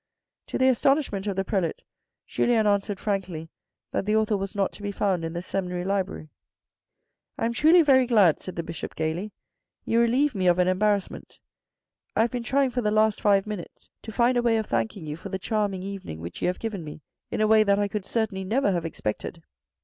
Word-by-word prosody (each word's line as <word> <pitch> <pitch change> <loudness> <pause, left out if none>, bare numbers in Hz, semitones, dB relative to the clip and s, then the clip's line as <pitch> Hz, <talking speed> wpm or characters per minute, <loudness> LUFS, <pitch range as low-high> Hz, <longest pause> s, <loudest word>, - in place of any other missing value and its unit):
To - - -3
the 260 - +3
astonishment 260 -5 +2
of 200 - -1
the 195 0 -1
prelate, 185 -6 -1 0.4
Julien 230 -3 +1
answered 200 -1 +1
frankly 180 -6 -3 0.4
that 195 - -2
that 210 - +2
author 220 -1 +2
was 195 0 -4
not 195 -1 +1
to - - -12
be 205 0 -3
found 195 -4 0
in 165 0 -4
the 175 +1 -4
seminary 180 -2 -3
library. 190 -5 -2 0.5
" - - -56
I - - -1
am 235 - 0
truly 325 +7 +6
very 260 -4 +5
glad," 205 -9 +4
said 185 - -7
the 170 - -3
Bishop 165 -1 -7
gaily, 160 +6 -2 0.5
"You 230 - +2
relieve 250 +5 +3
me 190 -3 0
of 175 0 +4
an 180 0 +3
embarrassment. 200 +1 -1 0.8
I - - +3
have 230 - +2
been 245 -1 -3
trying 265 +3 +1
for 245 0 -1
the 210 - +1
last 215 0 +2
five 200 -1 +3
minutes 210 -5 -8
to 220 - -8
find 240 +3 +2
a - - +3
way 235 -1 +2
of 220 - -1
thanking 115 - -2
you 150 0 -4
for 165 - -9
the 190 - -2
charm 205 0 -1
ing 185 - -6
evening 195 - -6
which 85 +1 -8
you - - +1
have 180 - -1
given 215 -6 -4
me 150 -1 -9 0.3
in - - -3
a 215 - +4
way 215 0 +5
that 200 -1 +3
I 205 0 +1
could 205 0 -4
certainly 220 -4 -1
never 215 +3 +1
have 170 -3 -1
expected. 160 +2 -4
200 Hz, 220 wpm, -26 LUFS, 180-225 Hz, 0.8 s, truly